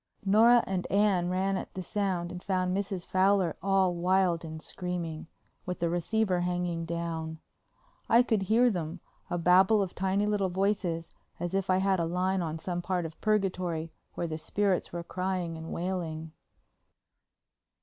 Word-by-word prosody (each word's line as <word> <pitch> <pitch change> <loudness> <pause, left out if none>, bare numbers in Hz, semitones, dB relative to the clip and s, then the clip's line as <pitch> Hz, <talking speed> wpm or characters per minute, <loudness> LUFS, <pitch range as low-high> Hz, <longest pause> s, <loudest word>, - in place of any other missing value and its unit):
Nora 230 +4 +6
and 185 -2 -2
Anne 195 -3 +2
ran 190 +1 0
at - - -7
the 185 - -4
sound 180 -3 -1
and 180 0 -7
found 185 -1 0
Mrs. 195 -2 -3
Fowler 190 -3 +2
all 195 -1 +3
wild 180 -1 +2
and 160 -1 -6
screaming, 170 -2 -5 0.4
with 180 - -2
the 170 -1 0
receiver 185 +2 +1
hanging 175 -1 -1
down. 165 -1 -3 0.7
I 235 +2 +6
could 220 -5 +1
hear 230 +5 +4
them, 170 -2 -4 0.3
a 175 - -1
babble 185 +5 +5
of 185 - -6
tiny 190 +2 0
little 205 -2 +1
voices 180 -3 -1 0.3
as 175 +1 -3
if 195 0 -1
I 185 - +4
had 190 -1 +2
a 170 - +1
line 185 +2 0
on 160 -1 -3
some 175 +2 -3
part 180 -1 -1
of 160 0 -9
Purgatory 180 -6 0 0.2
where - - -2
the 160 -1 -4
spirits 195 +2 0
were 170 0 -4
crying 180 -2 -2
and 160 0 -7
wailing. 165 -3 -3
180 Hz, 160 wpm, -29 LUFS, 170-195 Hz, 0.7 s, Nora